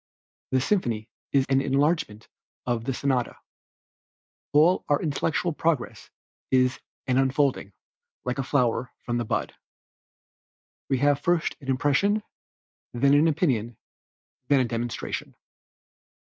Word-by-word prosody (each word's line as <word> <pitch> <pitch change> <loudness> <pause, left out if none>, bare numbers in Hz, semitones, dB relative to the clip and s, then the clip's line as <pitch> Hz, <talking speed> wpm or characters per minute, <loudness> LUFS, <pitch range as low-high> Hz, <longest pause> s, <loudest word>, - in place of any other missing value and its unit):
The 130 - +2
symphony 120 - 0 0.2
is 135 -2 +3
an 135 0 +3
enlargement 140 -5 0 0.4
of 120 -2 -1
the 135 - 0
sonata. 130 -3 -1 1.1
All 160 +5 +4
our 145 0 +3
intellectual 160 +2 -1
progress 155 -5 -2 0.4
is 130 0 +2 0.3
an 130 -1 +2
unfolding, 135 -5 +1 0.5
like 125 +2 -2
a - - 0
flower 125 -2 0
from 120 -1 -1
the 120 - -2
bud. - - -2 1.4
We 135 - +2
have 145 +2 +3
first 170 +2 0
an 135 - -12
impression, 145 +11 +2 0.7
then 140 +3 +3
an 150 +3 +5
opinion, 130 - 0 0.7
then 135 -3 +4
demonstration. 120 0 -4
135 Hz, 115 wpm, -26 LUFS, 125-145 Hz, 1.4 s, an